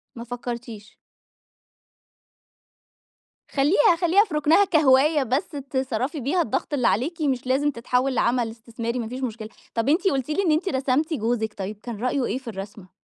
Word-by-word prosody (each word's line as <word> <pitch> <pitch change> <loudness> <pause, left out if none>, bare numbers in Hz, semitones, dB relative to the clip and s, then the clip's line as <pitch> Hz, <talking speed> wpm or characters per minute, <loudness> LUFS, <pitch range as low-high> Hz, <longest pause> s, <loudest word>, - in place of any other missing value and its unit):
ما 235 - -7
فكّرتيش. 235 -3 -7 2.6
خلّيها 295 +4 +4
خلّيها 360 +4 +5
في 375 - -10
رُكنها 300 +6 +4
كهواية، 300 -2 +4
بس 260 +4 -1 0.2
تِصرّفي 260 +2 -2
بيها 285 +8 +1
الضغط 295 +1 -2
اللي 255 -4 +2
عليكِ، 315 - 0
مش 265 -4 -1
لازم 280 +3 +2
تتحوّل 250 +2 0
لعمل 240 -1 +1
إستثماري، 230 +1 -5
ما 230 - -3
فيش 255 +3 -6
مشكلة. 220 -3 -4 0.2
طَب 230 +3 0
أنتِ 345 +6 +2
قلتِ 270 -5 0
لي 310 +6 +1
إن 340 - +2
أنتِ 320 +6 +1
رسمتِ 270 +4 0
جوزِك، 225 -4 -1
طيب 200 +2 -5
كان 235 -3 -6
رأيه 255 +2 0
إيه - - -2
في 265 -1 -12
الرسمة؟ 200 -2 -8
255 Hz, 160 wpm, -24 LUFS, 235-300 Hz, 2.6 s, خلّيها